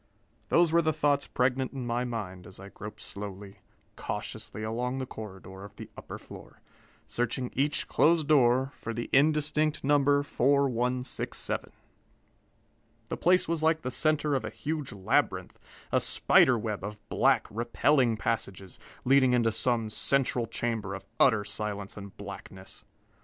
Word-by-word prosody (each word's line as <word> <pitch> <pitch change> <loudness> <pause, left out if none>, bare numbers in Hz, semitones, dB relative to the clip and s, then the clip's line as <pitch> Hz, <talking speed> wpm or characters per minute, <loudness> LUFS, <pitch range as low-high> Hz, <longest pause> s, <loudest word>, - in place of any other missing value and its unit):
Those 170 -1 +4
were 170 +1 +5
the 160 -1 +2
thoughts 145 -1 +1
pregnant 130 +1 0
in 130 -3 -5
my 120 +1 -1
mind 95 -7 -5
as 95 - -12
I 100 +1 -10
groped 105 +1 -9
slowly, 100 -1 -8 0.4
cautiously 110 - -6
along 120 +4 -2
the 130 - -3
corridor 95 -4 -9
of 100 - -11
the - - -10
upper - - -8
floor, - - -13 0.5
searching 120 +1 -2
each 140 +3 0
closed 160 -2 +3
door 130 -2 +4
for 115 -2 -6
the 120 - -5
indistinct 150 +1 +2
number 145 0 +3
4167. 125 -2 0 1.4
The - - -3
place 180 +1 +3
was 165 -1 0
like 160 0 +2
the 125 - -2
center 155 0 +1
of 135 - 0
a - - -3
huge 145 +6 -4
labyrinth, 95 -2 0 0.3
a - - +3
spider 130 -2 +4
web 105 -2 -4
of 105 +1 -5
black, 130 -2 +3
repelling 120 +2 +2
passages, 100 -5 -3 0.3
leading 130 -1 +5
into 115 -2 +3
some 115 -1 0
central 125 -2 +1
chamber 110 -4 -2
of 95 0 -9
utter 110 -6 +4
silence 105 -1 -4
and 100 -1 -10
blackness. 95 -1 -10
120 Hz, 145 wpm, -29 LUFS, 105-140 Hz, 1.4 s, were